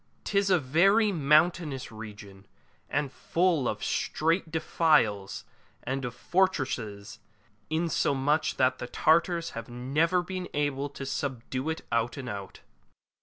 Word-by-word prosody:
'Tis 200 -1 +1
a 185 - +5
very 195 - +3
mountainous 155 -3 +2
region, 105 -3 -10 0.4
and 140 -3 -1
full 170 -7 +1
of - - -4
strait 165 +2 0
defiles 150 - +1 0.4
and 135 +2 -3
of 125 -1 -4
fortresses, 120 - -1 0.5
insomuch 155 -2 +1
that 130 0 +2
the 120 - -5
Tartars 170 +4 +2
have 115 +2 -7
never 150 +9 +1
been 185 0 -5
able 145 -1 -1
to 140 -1 -7
subdue 130 +1 -3
it 160 - -3
out 115 +1 0
and 130 -3 -5
out. 100 -3 -7
145 Hz, 125 wpm, -28 LUFS, 120-170 Hz, 0.5 s, a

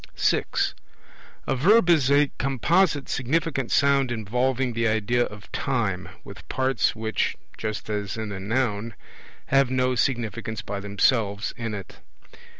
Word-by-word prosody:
(6) - - +1 0.7
A - - 0
Verb 190 - +5
is 155 -7 +4
a 145 0 +4
composite 145 - +2
significant 135 0 -1
sound 140 -2 +3
involving 125 +3 0
the 115 0 +1
idea 110 +3 +1
of 105 -1 -11
time, 110 -9 -1
with - - -12
parts 130 0 +1
which 110 0 -1 0.2
(just 110 -1 -4
as 105 -1 -3
in 110 -1 -4
the 100 -2 -5
Noun) 110 +1 -1 0.5
have 135 -1 +4
no 130 0 +1
significance 115 -3 -2
by 100 0 -4
themselves 100 +1 +1
in 115 -3 -4
it. 95 -3 -9
120 Hz, 135 wpm, -25 LUFS, 110-135 Hz, 0.7 s, Verb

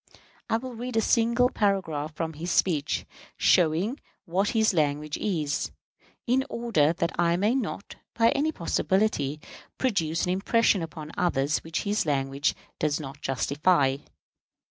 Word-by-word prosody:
I 225 - +3
will 255 +1 -7
read 240 0 -4
a - - +6
single 235 +2 +3
paragraph 175 - -1
from 160 0 -3
his 165 +4 -5
speech, 155 -5 +1 0.3
showing 180 - +3 0.3
what 190 +3 0
his 220 -2 +3
language 150 -2 0
is, 155 -8 -1 0.6
in 255 +2 +2
order 225 -11 +2
that 170 0 -1
I 170 0 +3
may 210 +5 +2
not, 235 -5 -4 0.2
by 230 0 +4
any 305 +3 +1
possibility, 170 - 0 0.4
produce 165 -10 0
an 180 - 0
impression 200 +1 +2
upon 155 -1 -7
others 155 -4 +1
which 165 +2 -4
his 205 -4 0
language 140 0 0 0.2
does 150 0 0
not 145 0 -8
justify. 140 +1 +2
170 Hz, 140 wpm, -27 LUFS, 150-220 Hz, 0.6 s, a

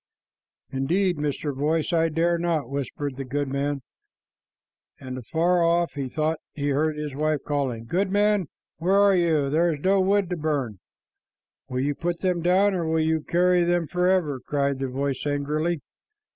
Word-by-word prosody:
"Indeed, 175 +7 +1
Mr. 145 -1 -2
Voice, 155 +4 0
I 165 0 +3
dare 170 +2 +1
not," 165 -6 0
whispered 140 0 -4
the 135 - -3
goodman; 140 +1 -2 1.2
and 130 -1 -7
afar 170 +8 +1
off 170 0 +2
he 140 -2 -4
thought 155 +3 -1
he 145 -1 -2
heard 150 +2 +1
his 150 -2 -4
wife 155 0 0
calling, 130 -6 -2
"Goodman, 200 - +1 0.3
where 185 +5 +2
are 200 -1 +5
you? 160 -6 +2
There 170 +3 +3
is 150 - -4
no 195 +1 +4
wood 195 0 +2
to 180 - -1
burn." 140 - -2 0.9
"Will 125 0 -1
you 145 +2 0
put 170 +3 -3
them 180 -2 0
down, 190 +4 +3
or 170 -3 -1
will 160 0 +1
you 160 0 +1
carry 180 +2 +3
them 175 0 +1
forever?" 180 -5 +1
cried 140 -2 -1
the 135 - -1
voice 135 +1 -2
angrily. 150 +3 -1
155 Hz, 160 wpm, -25 LUFS, 140-175 Hz, 1.2 s, are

